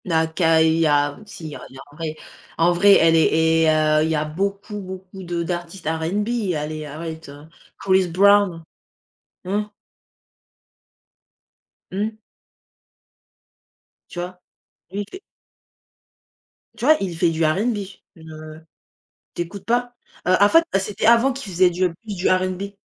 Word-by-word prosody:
Naka, 160 Hz, -1 st, +2 dB
il 160 Hz, 0 st, +2 dB
y 165 Hz, -, +3 dB
a, 145 Hz, -1 st, +2 dB
aussi, 205 Hz, -6 st, -11 dB
il -, -, -5 dB
y -, -, -8 dB
a -, -, -10 dB
il -, -, -16 dB
y -, -, -11 dB
a -, -, -10 dB
en -, -, -18 dB
vrai. 155 Hz, -1 st, -5 dB, 0.4 s
En 170 Hz, +2 st, +4 dB
vrai, 200 Hz, +4 st, +5 dB
elle 165 Hz, 0 st, +5 dB
est 160 Hz, 0 st, +3 dB
et -, -, +4 dB
heu, 155 Hz, 0 st, +3 dB
il 160 Hz, -, 0 dB
y 160 Hz, -, +1 dB
a 150 Hz, 0 st, 0 dB
beaucoup, 200 Hz, +6 st, -3 dB
beaucoup 190 Hz, 0 st, -9 dB
de 170 Hz, -1 st, -3 dB
d'artistes 175 Hz, +1 st, -5 dB
R&B, 195 Hz, +6 st, -1 dB
allez, 155 Hz, +1 st, -4 dB
arrête 160 Hz, +1 st, -7 dB
heu. 145 Hz, +2 st, -12 dB, 0.3 s
Chris 190 Hz, -1 st, +2 dB
brown? 195 Hz, -1 st, +3 dB, 0.8 s
Mmh. 200 Hz, +3 st, -1 dB, 2.3 s
Mmh. 215 Hz, +3 st, -3 dB, 1.9 s
Tu 175 Hz, -, -7 dB
vois? 180 Hz, +1 st, -6 dB, 0.5 s
Lui 200 Hz, -, -3 dB
il -, -, -5 dB
fait 375 Hz, -, -9 dB, 1.6 s
tu 235 Hz, -, -4 dB
vois? 310 Hz, +2 st, +6 dB
Il 180 Hz, -4 st, -3 dB
fait 170 Hz, 0 st, +3 dB
du 165 Hz, 0 st, -1 dB
R&B. 205 Hz, +9 st, +1 dB, 0.4 s
Une, 160 Hz, -1 st, -13 dB
heu 155 Hz, 0 st, -10 dB, 0.8 s
tu -, -, -2 dB
écoutes 175 Hz, +4 st, -9 dB
pas? 245 Hz, +1 st, 0 dB, 0.3 s
Heu, 185 Hz, -, +5 dB
en 205 Hz, -, +7 dB
fait, 330 Hz, +8 st, +5 dB
c'était 200 Hz, +2 st, -2 dB
avant 235 Hz, +4 st, +5 dB
qu'il 255 Hz, -7 st, -8 dB
faisait 180 Hz, +1 st, +4 dB
du 180 Hz, 0 st, 0 dB
plus 210 Hz, +3 st, -8 dB
du 180 Hz, -1 st, 0 dB
R&B. 185 Hz, +2 st, -1 dB
175 Hz, 160 wpm, -21 LUFS, 160-200 Hz, 2.3 s, en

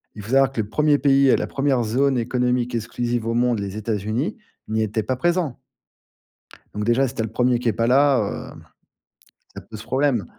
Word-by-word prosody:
il 105 Hz, -, -8 dB
faut 115 Hz, -, -8 dB
savoir 135 Hz, -1 st, +4 dB
que 115 Hz, -4 st, -2 dB
le 105 Hz, -, -7 dB
premier 150 Hz, +1 st, +2 dB
pays 140 Hz, 0 st, +3 dB
et -, -, +6 dB
la -, -, -2 dB
première 135 Hz, -3 st, 0 dB
zone 130 Hz, +4 st, +1 dB
économique 125 Hz, 0 st, 0 dB
exclusive 120 Hz, 0 st, -2 dB
au 115 Hz, -, 0 dB
monde, 120 Hz, -2 st, +1 dB
les 100 Hz, 0 st, -5 dB
États-Unis, 110 Hz, -, -2 dB, 0.3 s
n'y 110 Hz, +1 st, -1 dB
étaient 110 Hz, 0 st, -1 dB
pas 130 Hz, -, -1 dB
présents 170 Hz, -1 st, -1 dB, 1.2 s
donc 105 Hz, 0 st, -3 dB
déjà, 120 Hz, +4 st, +2 dB
si 130 Hz, -, -8 dB
tu 115 Hz, -, -2 dB
as -, -, -1 dB
le 110 Hz, -, -8 dB
premier 125 Hz, 0 st, +1 dB
qui 120 Hz, -, 0 dB
est -, -, 0 dB
pas 115 Hz, +2 st, 0 dB
là 130 Hz, -5 st, +2 dB
hem, -, -, -14 dB, 0.9 s
ça -, -, -7 dB
pose 110 Hz, -1 st, -11 dB
problème. 130 Hz, -7 st, 0 dB
120 Hz, 210 wpm, -22 LUFS, 110-135 Hz, 1.2 s, et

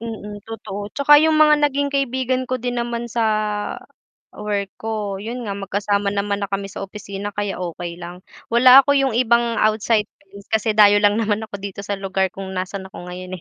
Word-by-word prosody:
Mm, 210 Hz, -2 st, -7 dB
totoo 205 Hz, -2 st, -6 dB
tsaka 290 Hz, +1 st, +6 dB
yung 315 Hz, +1 st, +3 dB
mga 300 Hz, -1 st, +5 dB
naging 285 Hz, -1 st, +1 dB
kaibigan 260 Hz, -2 st, -1 dB
ko 255 Hz, -, -2 dB
din 245 Hz, 0 st, -3 dB
naman 235 Hz, 0 st, -3 dB
sa 230 Hz, 0 st, -1 dB, 1.1 s
work 200 Hz, -2 st, -3 dB
ko, 210 Hz, -3 st, -4 dB
yun 235 Hz, +5 st, -6 dB
nga 200 Hz, -2 st, -4 dB
magkasama 200 Hz, +1 st, -1 dB
naman 200 Hz, 0 st, -1 dB
na 200 Hz, -, -2 dB
kami 195 Hz, 0 st, -4 dB
sa 195 Hz, -, -6 dB
opisina 200 Hz, 0 st, -7 dB
kaya 205 Hz, -2 st, -3 dB
okey 175 Hz, -1 st, -5 dB
lang. 175 Hz, +1 st, -9 dB, 0.2 s
Wala 250 Hz, +3 st, +7 dB
ako 285 Hz, -, +3 dB
yung 270 Hz, -1 st, +2 dB
ibang 235 Hz, -1 st, +2 dB
outsider 215 Hz, 0 st, +2 dB, 0.5 s
kasi 220 Hz, 0 st, +1 dB
dayo 205 Hz, -1 st, +6 dB
lang 205 Hz, +1 st, +4 dB
naman 220 Hz, -1 st, 0 dB
ako 200 Hz, -2 st, -7 dB
dito 200 Hz, 0 st, -7 dB
sa 200 Hz, 0 st, -4 dB
lugar 190 Hz, -1 st, -1 dB
kung 195 Hz, 0 st, -8 dB
nasaan 190 Hz, +1 st, -4 dB
ako 180 Hz, -2 st, -10 dB
ngayon, 185 Hz, 0 st, -7 dB
210 Hz, 185 wpm, -21 LUFS, 195-235 Hz, 1.1 s, Wala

